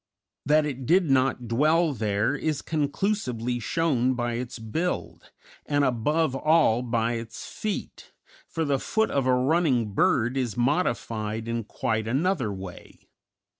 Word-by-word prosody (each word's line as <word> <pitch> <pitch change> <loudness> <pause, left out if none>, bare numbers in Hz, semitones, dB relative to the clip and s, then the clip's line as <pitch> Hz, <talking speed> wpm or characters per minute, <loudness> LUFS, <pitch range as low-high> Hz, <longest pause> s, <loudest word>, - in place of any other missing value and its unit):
That 150 +1 +4
it 130 -4 -5
did 175 -3 +3
not 130 -2 +2
dwell 155 +7 +3
there 105 +1 0
is 150 0 -2
conclusively 145 - -1
shown 130 -2 +1
by 120 -1 -1
its 120 +1 -4
build, 155 +11 -3 0.3
and 145 -1 +1
above 140 +4 +1
all 155 -5 +3
by 115 -2 0
its 115 -1 -6
feet, 215 -2 -5 0.4
for 165 -2 -2
the 140 -2 +1
foot 220 +8 0
of 135 -2 0
a 130 - +4
running 130 - +1
bird 120 +5 +2
is 120 -5 -2
modified 115 -5 -1
in 115 -1 -2
quite 110 +1 -2
another 135 - 0
way. 95 -2 -10
130 Hz, 135 wpm, -26 LUFS, 115-155 Hz, 0.4 s, That